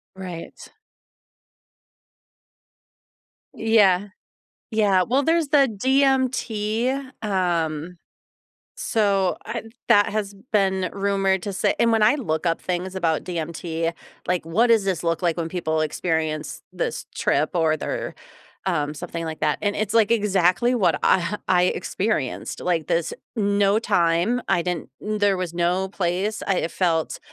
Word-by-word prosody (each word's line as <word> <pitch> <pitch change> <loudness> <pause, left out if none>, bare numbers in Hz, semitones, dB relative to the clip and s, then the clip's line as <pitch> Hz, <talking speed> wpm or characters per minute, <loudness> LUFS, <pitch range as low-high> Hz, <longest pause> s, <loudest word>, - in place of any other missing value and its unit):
Right. 180 -3 -8 3.0
Yeah. 205 -3 +3 0.7
Yeah, 200 -4 +3
well, 260 +8 +1
there's 325 -1 +1
the 280 -3 +5
DMT, 255 0 0
um, 175 -4 -1 0.8
so 200 -4 +1
I 235 -1 -5 0.2
that 205 -3 +6
has 205 -1 -3 0.2
been 190 -3 +2
rumored 195 -1 +1
to 200 - -4
say - - +1
and 230 0 +4
when 225 -1 +3
I 220 +6 +5
look 175 - -2
up 165 - +1
things 180 +1 -3
about 165 -4 0
DMT, 165 -1 -3 0.4
like, 180 -3 0
what 225 +9 +2
does 225 -4 +4
this 185 -4 -1
look 165 +1 0
like 170 -3 +1
when 165 -1 -2
people 160 -3 -1
experience 155 0 -2
this - - -3
trip 150 +2 +1
or 160 -2 +2
they're, - - -4 0.5
um, 150 -4 0
something 170 +1 -5
like 160 -1 -6
that 150 -1 +1
and 205 -1 0
it's, 215 +1 -2
like, 225 -1 +4
exactly 210 +2 +2
what 200 - +2
I 190 +3 +2
I 180 -1 +4
experienced, 185 - -2
like, 170 -3 0
this 165 -1 0 0.3
mm 200 -1 +1
no 200 +1 +4
time, 185 +3 +2
I 170 - +2
didn't 175 -5 -3
there 205 -2 +1
was 180 -2 -4
no 180 +2 +1
place 190 +3 -2
I 180 -4 +1
felt 165 -4 0
190 Hz, 135 wpm, -23 LUFS, 170-215 Hz, 3.0 s, that